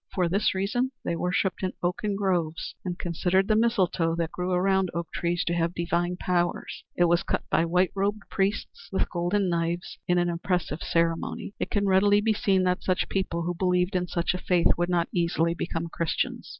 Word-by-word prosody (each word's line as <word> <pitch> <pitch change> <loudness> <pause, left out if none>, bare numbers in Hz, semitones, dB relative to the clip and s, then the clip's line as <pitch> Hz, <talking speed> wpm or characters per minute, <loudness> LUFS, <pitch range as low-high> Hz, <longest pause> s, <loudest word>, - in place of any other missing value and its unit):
For 180 -2 +2
this 195 +3 +1
reason 245 +7 0
they 170 - 0
worshipped 180 +2 0
in 185 -1 -1
oaken 200 +4 -1
groves, 175 -5 -1
and 180 -2 -3
considered 180 +3 +1
the 215 - +3
mistletoe 190 -7 +2
that 165 -1 -2
grew 180 +1 -3
around 190 +1 +2
oak 170 -1 -3
trees 175 0 0
to 170 - 0
have 170 0 0
divine 175 +1 -1
powers. 175 -1 -1
It 175 - +3
was 170 +1 +3
cut - - -2
by 165 - +3
white 180 +2 +2
robed 200 +1 -1
priests 195 +1 -2
with 190 - -1
golden 180 +3 0
knives 170 0 -2
in 180 - +3
an 175 0 +2
impressive 170 -2 -2
ceremony. 165 +3 -1
It - - -2
can 205 -1 0
readily 200 +2 +4
be 220 +1 +2
seen 195 -3 +2
that 180 0 +1
such 185 -1 0
people, 185 -3 -1
who 175 +1 -1
believed 180 +1 +1
in 180 -1 0
such 170 0 0
a 180 - -3
faith, 175 -2 +3
would 175 +1 -1
not 175 -1 +1
easily 170 -1 +1
become 170 -1 -3
Christians. 165 -1 -2
180 Hz, 195 wpm, -27 LUFS, 170-190 Hz, -, readily